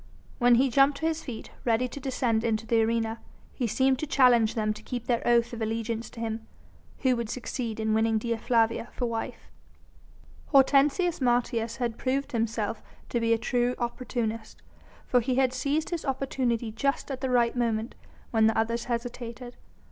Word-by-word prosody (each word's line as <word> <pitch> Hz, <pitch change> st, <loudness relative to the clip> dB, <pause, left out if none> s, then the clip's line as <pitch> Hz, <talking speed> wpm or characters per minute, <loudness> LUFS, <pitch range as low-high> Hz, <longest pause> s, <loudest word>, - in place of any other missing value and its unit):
When 245 Hz, -1 st, +6 dB
he 260 Hz, +2 st, +3 dB
jumped 275 Hz, +2 st, +4 dB
to 320 Hz, -, -3 dB
his 320 Hz, 0 st, -1 dB
feet, 240 Hz, -5 st, -7 dB
ready 240 Hz, +1 st, +2 dB
to 265 Hz, -, -8 dB
descend 245 Hz, -4 st, 0 dB
into 225 Hz, -1 st, 0 dB
the 225 Hz, 0 st, +3 dB
arena, 225 Hz, 0 st, 0 dB, 0.3 s
he 245 Hz, -, -1 dB
seemed 260 Hz, +4 st, +2 dB
to 310 Hz, -, -3 dB
challenge 245 Hz, -5 st, +4 dB
them 215 Hz, -1 st, 0 dB
to 215 Hz, -, -11 dB
keep 245 Hz, +1 st, -5 dB
their 240 Hz, -2 st, +1 dB
oath 235 Hz, 0 st, +3 dB
of 230 Hz, -, -6 dB
allegiance 225 Hz, +1 st, -2 dB
to 230 Hz, -, -12 dB
him, 225 Hz, -1 st, -4 dB, 0.5 s
who 260 Hz, -2 st, +3 dB
would 235 Hz, -2 st, -3 dB
succeed 235 Hz, -2 st, -4 dB
in 220 Hz, 0 st, 0 dB
winning 220 Hz, 0 st, +2 dB
Dea 230 Hz, +1 st, -1 dB
Flavia 230 Hz, 0 st, +1 dB
for 250 Hz, -, -2 dB
wife. 230 Hz, -1 st, -5 dB, 1.0 s
Hortensius 290 Hz, +5 st, +4 dB
Martius 240 Hz, -2 st, +1 dB
had 235 Hz, -3 st, -3 dB
proved 275 Hz, +2 st, -1 dB
himself 225 Hz, -1 st, -1 dB, 0.3 s
to 240 Hz, -, 0 dB
be 230 Hz, 0 st, +1 dB
a 230 Hz, -, +4 dB
true 245 Hz, +2 st, 0 dB
opportunist, 235 Hz, -2 st, -4 dB, 0.4 s
for 250 Hz, -, +3 dB
he 250 Hz, +2 st, -1 dB
had 260 Hz, -1 st, +2 dB
seized 285 Hz, +6 st, -1 dB
his 340 Hz, -2 st, -2 dB
opportunity 255 Hz, -4 st, -1 dB
just 275 Hz, +6 st, -1 dB
at 265 Hz, -1 st, -5 dB
the 265 Hz, -, -1 dB
right 240 Hz, -1 st, +2 dB
moment 230 Hz, -1 st, -1 dB, 0.4 s
when 220 Hz, -1 st, +4 dB
the 220 Hz, -, +1 dB
others 230 Hz, +1 st, 0 dB
hesitated. 240 Hz, 0 st, -5 dB
235 Hz, 180 wpm, -27 LUFS, 225-255 Hz, 1.0 s, When